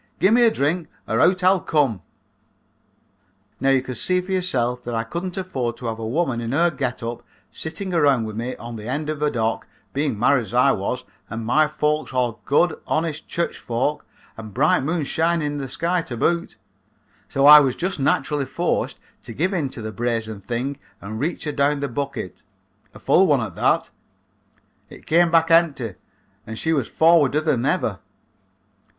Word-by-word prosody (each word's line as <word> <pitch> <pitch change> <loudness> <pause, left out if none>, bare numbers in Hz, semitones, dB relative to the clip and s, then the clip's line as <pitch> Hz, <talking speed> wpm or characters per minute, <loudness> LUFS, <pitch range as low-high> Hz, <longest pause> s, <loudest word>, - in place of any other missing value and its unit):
Gimme 220 +6 +4
a 235 - +7
drink 160 -2 -1 0.2
or 110 - 0
out 180 +5 +3
I'll 185 +1 +5
come.' 140 - 0 1.6
"Now 135 - +1
you 135 -1 +3
can 130 - -5
see 180 +9 0
for 180 +1 -6
yourself 125 -10 0
that 120 -1 -5
I 115 - 0
couldn't 175 - -5
afford 130 -11 -3
to 125 - -9
have 115 -1 -3
a 110 - -4
woman 130 -2 0
in 115 +2 -3
her 170 +4 +3
get 130 -4 -3
up 115 +1 -4 0.3
sitting 185 +4 -5
around 140 -7 +3
with 110 -1 -6
me 120 +3 -4
on 120 0 -8
the 105 +1 -8
end 150 +4 -2
of 150 -1 -6
a 150 - +2
dock, 115 -4 -2 0.3
being 140 -5 -1
married 130 +4 +3
as 110 - -9
I - - +5
was - - -2 0.3
and 115 0 -5
my 150 +6 +3
folks 150 -1 -1
all 120 -4 -1
good 165 +4 +2
honest 160 -1 -2
church 170 - -2
folks, 125 +6 -2 0.3
and 110 -2 -9
bright 155 +8 +3
moon 160 +3 -1
shining 165 +2 0
in 145 0 -2
the 135 -2 -5
sky 170 +6 0
to 120 -7 -7
boot, 170 +8 0 0.7
so 135 - +1
I 150 +1 +11
was 135 -3 +1
just 185 -2 -2
naturally 140 +1 +1
forced - - -1 0.2
to 115 - -10
give 185 +5 0
in 155 -7 -1
to 120 -3 -8
the 110 - -4
brazen 110 -1 -3
thing 125 +7 -3 0.2
and 110 +3 -7
reach 160 +7 -2
her 150 - -2
down 140 0 +1
the 140 - -2
bucket, 140 - -5 0.5
a - - -9
full - - +4
one - - +3
at - - -4
that. - - +1 1.0
It - - -14
came 170 +2 +4
back 165 0 +3
empty 150 - +3 0.5
and 110 0 -6
she 160 +6 0
was 140 -7 0
forwarder 155 -3 +4
than 140 -6 0
ever. - - 0
140 Hz, 190 wpm, -22 LUFS, 120-165 Hz, 1.6 s, I